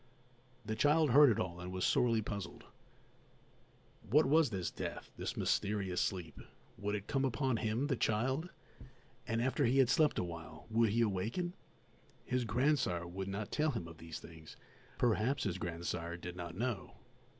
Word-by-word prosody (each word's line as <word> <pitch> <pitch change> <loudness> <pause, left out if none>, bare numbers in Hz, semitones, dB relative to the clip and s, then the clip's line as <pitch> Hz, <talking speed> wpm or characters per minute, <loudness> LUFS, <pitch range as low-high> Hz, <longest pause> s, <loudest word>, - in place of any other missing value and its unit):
The 110 +1 -2
child 150 +4 +4
heard 145 +2 +8
it 110 - +1
all 85 -1 -3
and 90 +1 -6
was 95 0 -1
sorely 115 -3 +3
puzzled. 100 -2 -5 1.5
What 150 +7 +5
was 150 +1 +4
this 95 -5 -3
death, - - -6
this - - -4
mysterious 100 -3 0
sleep? 90 -5 -3 0.4
Would 105 0 -1
it 100 -1 -4
come 135 +2 0
upon 130 -1 +1
him, 110 +5 0
the 145 -2 +1
child? 130 +10 0 0.8
And 115 0 0
after 130 +3 +1
he 125 +3 +3
had 130 -3 +5
slept 150 +3 +3
awhile 80 -2 -5
would 115 0 +4
he 115 +3 +2
awaken? 115 - -1 0.7
His 125 -1 0
grandsire 115 - +1
would 95 +2 -5
not 100 +1 -4
tell 155 +1 +2
him 105 - -3
of 85 -1 -12
these 80 -2 -7
things; 80 -1 -12 0.4
perhaps 125 +3 +2
his 95 -2 -2
grandsire 85 0 -3
did 90 0 -7
not 85 -1 -6
know. 120 -3 -3
110 Hz, 160 wpm, -35 LUFS, 90-130 Hz, 1.5 s, heard